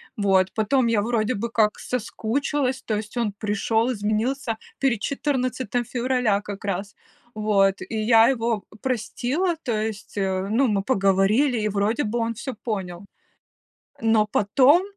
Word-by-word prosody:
Вот, 195 -2 +2
потом 240 +4 +2
я 225 -3 +2
вроде 230 +1 0
бы 235 +1 -3
как 215 -2 +1
соскучилась, 255 +3 -2
то 215 - -1
есть 215 +3 -5
он 220 -4 0
пришёл, 220 +3 0
изменился 225 +3 -1 0.2
перед 255 -6 +1
14 255 -4 -1
февраля 245 -4 +1
как 205 -1 -8
раз, 200 +1 -3 0.4
вот, 205 -2 +2
и 225 - -6
я 225 +1 +5
его 230 -5 0 0.2
простила, 260 - -1
то 240 - -2
есть, 215 -1 -4
э, 190 -1 -1
ну, 255 +3 +3
мы 200 -3 0
поговорили, 205 +4 +2
и 210 - 0
вроде 210 +7 0
бы 225 +3 -2
он 230 0 -1
всё 260 +4 -5
понял, 190 -5 -4 1.0
но 225 -1 +3
потом 260 - +4
225 Hz, 145 wpm, -24 LUFS, 205-250 Hz, 1.0 s, я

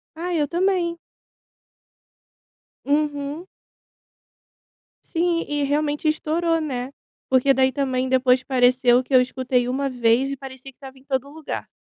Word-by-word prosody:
Ah 350 +2 -4
eu 300 -3 +1
também. 345 0 0 1.9
Uhum. 290 +2 -1 1.6
Sim 340 0 0
e 295 0 -1
realmente 295 +2 0
estourou, 325 +2 0
né, 260 -3 -4 0.4
porque 260 +1 +4
daí 265 0 +2
também 260 -2 -1
depois 255 -1 +3
pareceu 255 -1 +3
que 265 - -8
eu 255 - +8
escutei 250 -1 -1
uma 275 +2 -1
vez 245 +2 +2
e 275 - -4
parecia 265 0 -10
que - - -42
estava 270 -1 -12
em 260 - -19
todo 270 0 -2
lugar. 310 +1 -7
275 Hz, 130 wpm, -22 LUFS, 255-305 Hz, 1.9 s, eu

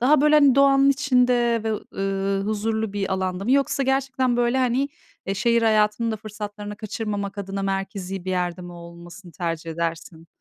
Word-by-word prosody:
Daha 275 +4 +4
böyle, 300 +1 +4
hani, 285 -4 +6
doğanın 275 0 +5
içinde 250 -4 +2
ve 220 - 0
ı 215 - -5
ııı, 195 0 -1
huzurlu 220 0 -1
bir 195 -2 -2
alanda 185 0 -2
mı? 240 - -1
Yoksa 275 0 +2
gerçekten, 265 -2 0
böyle, 245 +2 +1
hani, 260 +2 +1 0.4
eee, 195 - -1
şehir 235 +2 +2
hayatının 215 +1 +2
da 220 - -2
fırsatlarını 210 -1 -7
kaçırmamak 205 -2 -4
adına 195 0 -4
merkezi 195 -1 -3
bir 185 - -3
yerde 180 -1 -1
mi 175 - -9
olmasını 170 +1 -12
tercih 165 -2 -4
edersin? 165 0 -4
210 Hz, 175 wpm, -23 LUFS, 190-245 Hz, 0.4 s, hani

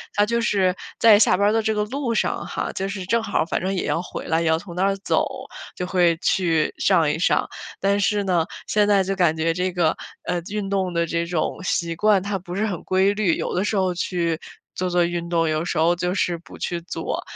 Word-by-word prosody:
它 205 - +4
就 235 +2 0
是 190 -5 +2 0.2
在 220 -3 +7
下 210 - +4
班 200 - +3
儿 - - +1
的 225 - +2
这 220 0 0
个 210 - +1
路 240 +1 -2
上 - - 0
哈， - - -3
就 195 +1 -3
是 190 -2 -5
正 230 +4 +1
好 215 -2 -2
儿 - - +1
反 165 - -2
正 190 - -1
也 185 - -1
要 165 - 0
回 - - -7
来， 160 +1 +1
也 165 - 0
要 160 0 +3
从 175 +1 -9
那 180 - -1
儿 195 0 +2
走， 195 - +1 0.5
就 180 - -3
会 175 -3 +2
去 165 -4 +1
上 155 -3 +3
一 - - -3
上。 - - +2 0.3
但 200 +1 +1
是 205 0 +1
呢， 175 -4 +1 0.2
现 210 -1 +2
在 200 -2 +4
就 195 +1 -2
感 170 -4 +2
觉 165 +1 +1
这 180 +2 -1
个， 175 -3 +1 0.3
呃， 175 -1 -2
运 205 -1 -3
动 190 -2 0
的 170 -1 0
这 170 +1 -2
种 170 +1 -2
习 170 -2 -1
惯 200 +1 +3
它 200 -1 -2
不 180 0 -8
是 215 - 0
很 190 -6 -4
规 190 +2 +2
律。 205 -5 +1
有 - - -3
的 185 - 0
时 210 0 -1
候 185 -2 +1
去 170 -2 -1 0.4
做 185 0 -1
做 175 0 +2
运 170 0 -3
动， 165 -1 +1
有 155 +2 -1
时 175 - -2
候 165 +2 +4
就 180 +1 -1
是 175 -3 0
不 170 - -14
去 175 -1 -3
做， 170 - -4
185 Hz, 265 characters per minute, -23 LUFS, 170-200 Hz, 0.5 s, 在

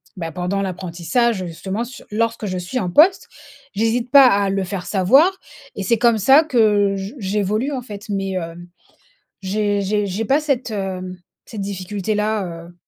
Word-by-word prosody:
bah, 165 -3 -5
pendant 180 +3 -2
l'apprentissage 185 +4 -1
justement 190 +6 -4
sur 255 +4 -11
lorsque 230 +1 -1
je 185 -2 -3
suis 180 +8 -3
en 185 -6 -2
poste. 335 - +4 0.5
J'hésite 225 +4 0
pas 275 -2 +8
à 200 -4 +2
le 195 0 -1
faire 185 0 -5
savoir, 270 - +4 0.4
et 200 - -4
c'est 230 +5 +2
comme 235 0 +3
ça 270 +9 +6
que 210 -7 +2
je 195 +3 -6
j'évolue 210 +4 -1
en 260 - -3
fait. 210 -4 -9
Mais 195 -1 -2
hem, 175 -1 -6 0.8
j'ai 205 +1 0
j'ai 205 +1 0
j'ai 200 +3 -3
pas 275 +7 +2
cette, 270 -6 -1
heu, 185 -2 -4 0.3
cette 215 - -8
difficulté 200 +1 -3
là, 210 -1 0 0.2
heu. 175 - -17
205 Hz, 170 wpm, -20 LUFS, 190-230 Hz, 0.8 s, pas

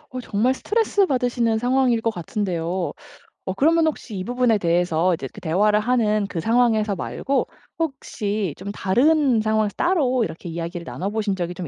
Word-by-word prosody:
어 255 - -5
정말 240 +2 +1
스트레스 415 - +1
받으시는 245 -4 +1
상황일 245 0 +2
것 230 - 0
같은데요. 180 -2 -3 0.5
어 190 - -2
그러면 320 - +3
혹시 255 -7 -4
이 185 - -3
부분에 245 0 +2
대해서 175 -1 +1
이제 150 -5 -4
그 - - -11
대화를 210 +6 +2
하는 215 -3 +1
그 180 - -4
상황에서 225 0 +2
말고 270 +9 -2 0.3
혹시 215 - -2
좀 200 +2 -6
다른 250 +5 +2
상황에서 215 -1 +1
따로 275 -9 +2
이렇게 175 -3 -6
이야기를 170 +1 -5
나눠 190 +4 -4
보신 210 -2 -1
적이 175 -1 -3
좀 175 -1 -6
215 Hz, 370 characters per minute, -22 LUFS, 185-250 Hz, 0.5 s, 그러면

